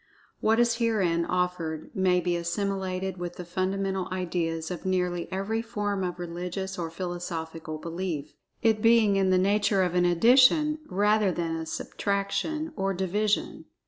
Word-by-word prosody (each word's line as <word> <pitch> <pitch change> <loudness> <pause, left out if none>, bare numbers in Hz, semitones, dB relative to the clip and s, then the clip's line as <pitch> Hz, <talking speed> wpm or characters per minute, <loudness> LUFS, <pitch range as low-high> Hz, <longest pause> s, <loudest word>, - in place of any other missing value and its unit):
What 220 +1 +3
is 235 -1 +3
herein 195 -8 +1
offered 180 -3 -2
may 185 -2 +3
be 175 0 0
assimilated 190 +1 -2
with 175 0 -5
the 180 - -7
fundamental 190 +1 -1
ideas 170 -3 -2
of 175 - -5
nearly 180 -2 -1
every 200 +4 -1
form 205 -3 -2
of 180 -1 -3
religious 180 +2 -5
or 165 -1 -2
philosophical 165 -2 -5
belief, 165 -2 -4 0.3
it 220 -2 +3
being 225 -3 +5
in 195 -1 +2
the 185 - +4
nature 200 +1 +2
of 180 -1 -1
an 180 0 +3
Addition 255 - +5
rather 210 +1 +2
than 165 -2 -2
a 160 0 -5
Subtraction, 200 - -2
or 195 -1 -1
Division. 205 +3 -1
185 Hz, 145 wpm, -27 LUFS, 175-205 Hz, 0.3 s, being